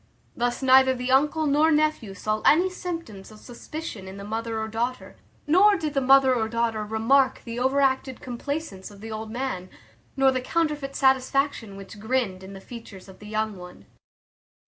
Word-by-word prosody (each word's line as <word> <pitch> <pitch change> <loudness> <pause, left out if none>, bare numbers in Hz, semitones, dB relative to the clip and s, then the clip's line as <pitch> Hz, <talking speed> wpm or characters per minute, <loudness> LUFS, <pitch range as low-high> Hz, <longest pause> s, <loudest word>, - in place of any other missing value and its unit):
Thus 245 +2 -1
neither 260 0 +6
the 250 +1 -3
uncle 300 +4 +3
nor 300 +2 +3
nephew 300 -10 +1
saw 215 +2 -2
any 360 +5 +4
symptoms 330 - -7
of 215 - -14
suspicion 240 -3 -8
in 190 +1 -9
the 200 - -8
mother 225 +2 -3
or 220 - -3
daughter; 235 +3 -4 0.3
nor 380 +7 +5
did 310 -4 -3
the 275 - +1
mother 270 0 +5
or 220 -3 -1
daughter 230 -2 -1
remark 225 +6 +2
the 230 0 -5
overacted 265 0 +1
complacence 250 -4 -5
of 205 -1 -15
the 225 0 -8
old 220 0 -5
man, 225 -6 -4 0.5
nor 270 0 +5
the 255 -1 -2
counterfeit 295 -1 -2
satisfaction 265 -5 +1
which 200 +1 -11
grinned 220 -4 -1
in 190 +1 -10
the 195 - -9
features 215 -5 -11
of 190 -1 -14
the 210 - -11
young 215 -1 -2
one. 180 0 -12
250 Hz, 175 wpm, -25 LUFS, 215-275 Hz, 0.5 s, neither